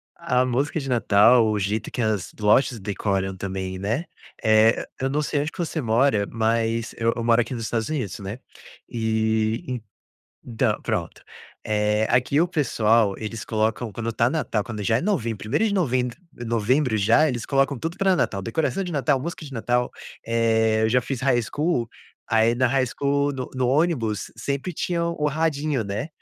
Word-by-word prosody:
A 130 -7 +1
música 140 +5 0
de 135 -2 -5
Natal, 115 0 +5
o 105 -1 0
jeito 105 +3 -2
que 125 - -3
as 110 -4 -1
lojas 110 +3 +3
decoram 95 -1 -2
também, 95 -1 -4
né. 110 - -2 0.4
Eh 110 0 +6
eh, - - -7 0.2
eu 135 - 0
não 150 +2 0
sei 145 -1 -1
onde 150 +2 -3
que - - -16
você 165 -1 -2
mora, 115 -2 +2
mas 115 0 0
eu 115 0 +1
eu 115 - -3
moro 115 0 +4
aqui 120 +2 -4
nos 115 - -4
Estados 115 -1 -2
Unidos, 125 - -3
né. 100 +4 -6 0.5
E 110 +1 -1 0.6
então, 115 -2 -1
pronto. 105 -8 -3 0.4
Eh, 105 0 +1
aqui 125 +5 +3
o 175 - +2
pessoal, 115 - +2
eles 110 0 -5
colocam 110 +1 -1
quando 115 +2 -3
tá 115 +2 +2
Natal, 115 -9 -1
quando 105 -1 -6
já 110 +2 +2
é - - -2
novembro, 115 - -1
1º 140 - 0
de 200 - -1 0.7
novembro, 115 +2 +1
já, 115 +9 +4
eles 120 -2 -3
colocam 135 0 +1
tudo 165 +7 -4
pra 190 -2 +3
Natal, 100 - 0
decoração 160 - -1
de 180 - -5
Natal, 145 -2 +1
música 160 +2 -6
de 140 - -10
Natal, 120 +1 0 0.3
eh, 110 -1 +2
eu 110 - +3
já 125 +2 +3
fiz 135 0 -4
high 130 -2 +3
school 135 0 -1 0.4
aí 115 +1 +3
na 130 +1 +2
high 130 +1 +2
school, 140 +2 0
no 130 -2 -5
no 130 -1 0
ônibus 130 - 0
sempre 140 +5 -3
tinha 170 +2 -1
o 170 -3 -1
rapidinho, 150 -3 0
né, 100 +7 -3
115 Hz, 180 wpm, -24 LUFS, 110-140 Hz, 0.7 s, Eh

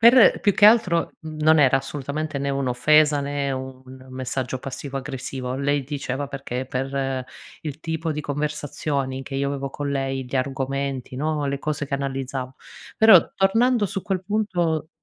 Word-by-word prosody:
Per, 235 0 +7
più 205 -2 +2
che 205 - +7
altro, 200 -7 +4
mhmm, 155 -1 -8
non 160 +1 +6
era 135 -2 +5
assolutamente 145 +2 -4
né 140 0 -2
un'offesa 140 +3 +3
né 140 0 -2
un 130 0 -7
messaggio 130 0 -3
passivo 135 +1 -6
aggressivo. 130 -1 -5
Lei 140 +1 +1
diceva 140 0 -4
perché 130 -2 -4
per 135 0 -2 0.4
il 150 -1 -6
tipo 160 0 -2
di 150 - -3
conversazioni 145 -2 -2
che 135 - -8
io 140 +1 0
avevo 140 -1 -3
con 140 +1 -4
lei, 135 -1 -2
di 125 +2 -3
argomenti, 135 0 -2
no, 150 +1 -1
le 140 0 -1
cose 145 0 -3
che 140 - -2
analizzavo. 135 -1 -3 0.4
Però 220 -6 +7
tornando 225 +4 +3
su 195 0 -3
quel 190 -1 -2
punto 180 -6 -1
140 Hz, 160 wpm, -23 LUFS, 135-155 Hz, 0.4 s, Per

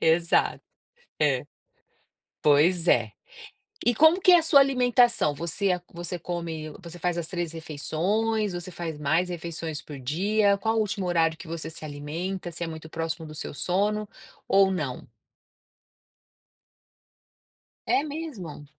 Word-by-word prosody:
Exato, 165 +1 +2 0.6
é. 140 -2 +2 1.0
Pois 160 +4 +4
é. 115 -4 +3 0.7
E 240 - +4
como 315 - +5
que 365 - +6
é 350 - +9
a - - +1
sua 290 -3 +6
alimentação? 245 - +3
Você 180 +4 -1
você 175 +1 -5
come, 165 -2 -5
você 175 0 -9
faz 175 0 -1
as 170 - -2
3 175 -2 -3
refeições, 190 +7 -1
você 175 +1 -6
faz 165 -3 -5
mais 165 +5 +1
refeições 165 -2 -5
por 145 -3 -9
dia, 200 +9 +2
qual 225 +2 0
o 220 - +3
último 205 -3 -2
horário 165 -2 +2
que - - -10
você 165 -1 -4
se 155 - -7
alimenta, 165 +6 -5
se 170 +1 -4
é - - -3
muito 160 -1 -8
próximo 165 0 -4
do 155 - -10
seu - - -6
sono, 205 +6 0 0.4
ou 195 0 +5
não? 150 -9 -3 2.8
É 280 - +3
mesmo? 285 - -7
175 Hz, 140 wpm, -26 LUFS, 160-205 Hz, 2.8 s, é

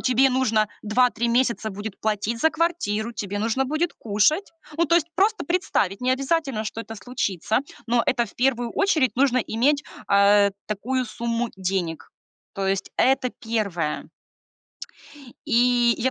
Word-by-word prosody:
тебе 260 +1 +3
нужно 225 -5 +2 0.2
2-3 235 +1 +2
месяца 235 -3 +1
будет 205 +1 -7
платить 215 +2 -1
за 320 - +4
квартиру, 240 -11 -1
тебе 205 -2 -4
нужно 230 +5 0
будет 310 +5 -1
кушать. 235 - +1 0.3
Ну, 335 - +4
то 335 - +3
есть 340 -1 +2
просто 420 0 +2
представить, 245 - 0
не 255 +1 +2
обязательно, 270 -4 -1
что 225 +1 -5
это 225 0 -8
случится, 215 -4 -1 0.3
но 235 0 +2
это 250 -3 +2
в - - -16
первую 245 -2 +1
очередь 315 - +2
нужно 260 -1 +3
иметь, 265 +6 +1 0.3
э, 200 0 +5 0.2
такую 250 +5 -2
сумму 235 0 -2
денег. 180 -6 -3 0.4
То 195 -1 -2
есть 195 0 -1
это 260 -1 +2
первое. 200 -11 -3 1.4
И 240 -2 +3
я 260 - +1
235 Hz, 145 wpm, -24 LUFS, 210-265 Hz, 1.4 s, э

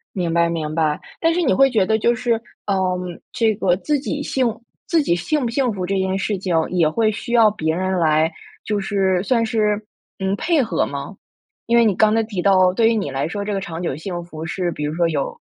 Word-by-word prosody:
明 175 -3 -1
白 170 0 +3
明 155 -2 -3
白， 155 -2 +1 0.2
但 330 0 +2
是 355 - 0
你 290 - +2
会 270 0 +5
觉 215 -7 +2
得 220 +3 +2
就 235 +2 +2
是， 240 0 0 0.3
呃， 190 -2 0 0.3
这 225 -4 +1
个 185 -4 +2
自 295 +9 0
己 290 +1 -3
幸 265 -2 0 0.4
自 335 -4 +3
己 170 -12 +1
幸 270 - -1
不 235 - -1
幸 250 0 0
福 185 -2 -3
这 195 +2 -1
件 190 0 0
事 200 +1 -1
情 185 -1 -3 0.2
也 170 -4 +2
会 215 +6 +1
需 235 - -6
要 225 -3 +6
别 160 -6 -1
人 185 +2 -1
来， 160 -1 +2 0.3
就 210 -1 -1
是 195 -2 0
算 230 +1 +1
是， 215 -2 0 0.3
嗯， 190 +1 0
配 320 +6 +1
合 185 -9 0
吗？ 140 +7 -6 0.5
因 235 +1 +3
为 235 - +5
你 210 -4 +2
刚 215 +3 +4
才 225 - +3
提 210 -5 -4
到， 185 -1 +4
对 225 +3 +3
于 230 - +1
你 200 -9 -1
来 135 0 -2
说， 200 +4 -4
这 210 - -2
个 195 - -2
长 170 -2 -6
久 165 - -2
幸 175 +3 -5
福 160 -2 -8
是 175 +2 -2
比 150 - -5
如 150 +1 -2
说 170 0 +2
有 150 -4 -3
195 Hz, 255 characters per minute, -20 LUFS, 170-225 Hz, 0.5 s, 要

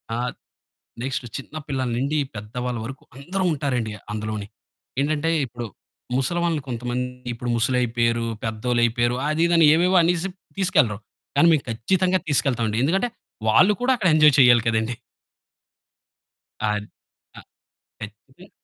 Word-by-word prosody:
ఆహ్, 125 +1 -2 0.7
నెక్స్ట్ 130 -1 -3
చిన్న 135 +3 -10
పిల్లల 130 -3 -2
నుండి, 140 +4 0 0.2
పెద్దవాళ్ళ 120 +4 -4
వరకు 135 +3 -8
అందరూ 185 +7 -3
ఉంటారండి 125 -7 -2 0.2
అందులోనె. 105 -1 -4 0.5
ఏంటంటే 155 +2 0
ఇప్పుడు 120 -1 -7 0.5
ముసలివాళ్లు 165 +2 0
కొంతమంది, 125 +1 -2 0.3
ఇప్పుడు 120 +1 -5
ముసలి 125 +2 +1
అయిపోయారు, 115 -1 0 0.2
పెద్దోళ్ళు 120 +2 -1
అయిపోయారు 120 +1 0
అదిదని 165 0 +4
ఏవేవో 180 +2 +3
అనేసి 175 +2 +1 0.3
తీసుకెళ్లరు. 150 - +2 0.4
కానీ 170 - +6
మేము 145 - +1
ఖచ్చితంగా 185 +11 +1
తీసుకెళ్తామండి 120 -6 +1
ఎందుకంటే 195 +10 +1 0.4
వాళ్ళు 185 - +5
కూడా 260 - +3
అక్కడ 190 -5 +1
ఎంజాయ్ 150 -2 +6
చేయాలి 120 -2 +6
కదండీ! 110 +1 0 1.8
అది. 105 0 -2 0.5
అ - - -9 0.6
ఖచ్చితంగా. 110 - -12
125 Hz, 120 wpm, -23 LUFS, 115-160 Hz, 1.8 s, కానీ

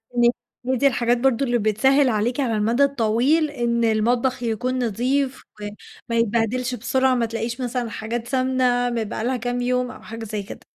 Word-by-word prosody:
إن 240 0 +5 0.4
هي 260 +1 +1
دي 280 +3 +4
الحاجات 240 -2 +1
برضه 265 +1 +2
اللي 240 -1 +1
بتسهّل 260 +6 +3
عليكِ 230 +4 0
على 250 -5 0
المدى 230 +6 +2
الطويل، 275 +4 +2
إن 235 -4 -1
المطبخ 240 +3 +1
يكون 250 +3 -1
نظيف 260 +5 -1 0.7
وما 230 - 0
يتبهدلش 235 +3 0
بسرعة، 260 +3 +1
ما 240 -2 +1
تلاقيش 230 +2 -4
مثلًا 245 -1 -2
حاجات 230 +2 -4
سمنة 255 -2 +1
م 235 -2 -1
بقى 220 +1 -5
لها 255 +1 0
كام 245 +1 -2
يوم 250 0 0
أو - - -12
حاجة 225 0 -8
زي 210 -1 -4
كده. - - -9
245 Hz, 180 wpm, -22 LUFS, 230-255 Hz, 0.7 s, إن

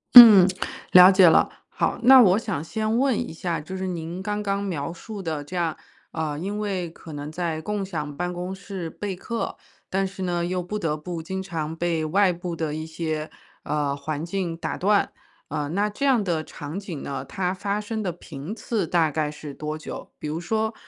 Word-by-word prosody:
嗯， 215 -7 +13 0.5
了 180 +1 +10
解 185 -3 +7
了。 - - +4 0.2
好， - - 0
那 260 +1 +9
我 195 -2 +6
想 205 -9 -2
先 220 +5 -1
问 270 -4 +2
一 - - -3
下， 165 0 -3
就 190 +5 -6
是 190 0 -3
您 170 +1 -4
刚 210 +1 -2
刚 200 0 0
描 170 -7 -3
述 200 +4 -8
的 160 -4 -3
这 180 - -9
样， 170 -3 0 0.3
呃， 155 -2 -2
因 200 +5 -3
为 190 -5 -2
可 160 -1 -11
能 145 +1 -6
在 165 -2 -2
共 210 +2 -2
享 150 -6 -4
办 180 0 -2
公 180 +2 -4
室 190 -3 -6
备 195 +3 -5
课， 230 +5 -4 0.3
但 195 +1 +1
是 190 0 -5
呢， 175 -1 0
又 180 +1 -1
不 180 +4 -4
得 160 -7 -1
不 165 +1 -6
经 190 +3 -4
常 160 -4 -4
被 165 -1 -1
外 185 +4 +3
部 175 0 -5
的 155 -2 -2
一 155 0 -4
些， 160 -1 -3 0.3
呃， 145 -2 -1
环 150 +2 -4
境 175 -2 -2
打 - - -3
断。 205 +2 +2 0.4
呃， 150 -1 -2
那 205 +5 +1
这 245 +7 -3
样 255 -6 +4
的 165 -4 -1
场 155 +4 -6
景 180 -8 -7
呢， 140 - -4
它 185 -1 -2
发 200 +2 -2
生 220 +1 -3
的 180 - -1
频 150 +3 -8
次 220 -4 -1
大 165 -1 +3
概 150 0 -1
是 150 -1 -8
多 155 +1 -4
久？ 155 - -8
比 - - -5
如 155 +2 -2
说， 220 +5 -1
175 Hz, 220 characters per minute, -25 LUFS, 160-200 Hz, 0.5 s, 嗯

